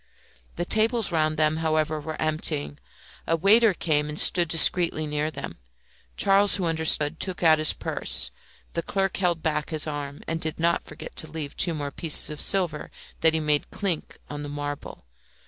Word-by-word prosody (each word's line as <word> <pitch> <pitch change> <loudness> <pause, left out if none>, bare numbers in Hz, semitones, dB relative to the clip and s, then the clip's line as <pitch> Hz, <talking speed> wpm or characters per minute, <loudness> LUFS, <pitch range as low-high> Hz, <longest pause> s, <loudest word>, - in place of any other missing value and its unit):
The 175 - -3
tables 220 +1 +1
round 155 -1 0
them, 155 0 +2
however, 155 -1 0
were 155 +1 -7
emptying; 75 - -3 0.5
a 165 - +2
waiter 215 +6 +5
came 150 -3 0
and 150 - -4
stood 175 -1 +4
discreetly 165 0 +3
near 150 +1 -2
them. 155 - -8 0.6
Charles, 200 +1 +4
who 190 - -2
understood, 160 -1 +1
took 185 -2 -4
out 160 -2 +5
his 155 - +3
purse; - - +1 0.4
the 170 - -1
clerk 195 +2 -2
held 175 -4 0
back 150 -2 -1
his 155 -2 -1
arm, 145 -2 -6
and 165 0 -3
did 160 0 -4
not 170 +1 +1
forget - - -10
to 160 - -1
leave 150 -2 -7
two 170 -3 0
more 145 -2 -4
pieces 155 +1 +4
of 150 - -6
silver 175 -6 +1 0.3
that 160 0 +3
he - - +1
made 150 -1 0
chink 185 -6 -4
on 145 0 -7
the 145 - -6
marble. 145 - -7
160 Hz, 180 wpm, -25 LUFS, 150-170 Hz, 0.6 s, waiter